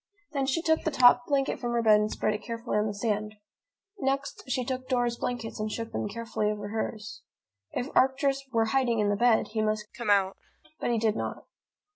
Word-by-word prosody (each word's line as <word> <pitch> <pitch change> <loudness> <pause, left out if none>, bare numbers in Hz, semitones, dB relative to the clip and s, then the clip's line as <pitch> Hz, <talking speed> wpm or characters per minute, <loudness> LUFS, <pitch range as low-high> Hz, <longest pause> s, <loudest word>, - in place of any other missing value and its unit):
Then 275 -2 -1
she 305 +5 0
took 320 -1 +2
the - - +1
top 245 -3 +5
blanket 275 -2 +1
from 240 -1 -2
her 235 -1 +1
bed 215 -1 +6
and 210 0 0
spread 215 - 0
it 210 - -4
carefully 230 -1 -4
on 210 - +1
the 205 - -3
sand. 210 0 -2 0.6
Next, 275 +1 -1
she 255 -1 0
took 255 0 -4
Dora's 245 -2 +1
blankets 235 -2 -4
and 215 0 -2
shook 230 +1 -4
them - - -2
carefully 220 -1 -2
over 205 -1 -4
hers. 215 -1 -4 0.5
If 255 +3 -4
Arcturus 275 +1 +2
were 225 -2 +2
hiding 255 -4 +2
in 210 -1 +2
the 205 - +2
bed, 235 +1 +3
he 220 0 -1
must 215 -1 -2
come 235 -2 -4
out. 195 -1 +3 0.4
But - - -1
he 235 - +2
did 220 -1 +1
not. - - -4
230 Hz, 210 wpm, -28 LUFS, 215-255 Hz, 0.6 s, bed